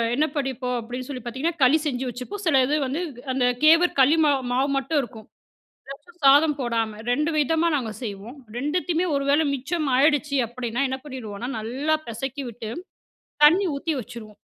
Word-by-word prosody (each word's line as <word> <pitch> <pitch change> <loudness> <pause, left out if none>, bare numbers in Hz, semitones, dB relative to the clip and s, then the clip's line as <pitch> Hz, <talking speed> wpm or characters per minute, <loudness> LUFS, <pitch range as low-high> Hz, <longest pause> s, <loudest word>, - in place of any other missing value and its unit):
என்ன 300 +4 +2
பண்ணிப்போம் 260 -3 -2
அப்படீன்னு 245 +2 -6
சொல்லி 260 -3 -5
பார்த்தீங்கன்னா, 265 +8 -2
களி 265 +5 +6
செஞ்சு 265 -3 -2
வச்சுப்போம். 255 - -7
சில 280 -6 +4
இது 290 +4 0
வந்து 275 +6 -2 0.3
அந்த 255 -1 +1 0.2
கேவர் 330 +2 +5
களி 280 +5 +5
மாவு 280 -3 +2
மாவு 265 +3 +1
மட்டும் 290 +3 0
இருக்கும். 225 -4 -10 0.6
அதாச்சும் 290 +6 -12
சாதம் 290 +2 +6
போடாம. 225 -3 -2
2 300 +5 +1
விதமா 320 +3 +2
நாங்க 240 -6 -2
செய்வோம். 215 +4 -7 0.2
2த்துமே 335 +5 0
ஒரு 280 - 0
வேள 290 +3 +4
மிச்சம் 295 +4 -2
ஆயிடுச்சு 295 0 +2
அப்படீன்னா 240 +1 -4
என்ன 265 0 -3
பண்ணிடுவோம்ன்னா, 245 -4 -6
நல்லா 265 +8 -1
பெசக்கிவிட்டு 240 -1 -5 0.8
தண்ணி 355 +7 +6
ஊத்தி 315 +3 -2
வச்சுருவோம். 230 -3 -11
270 Hz, 155 wpm, -24 LUFS, 245-300 Hz, 0.8 s, களி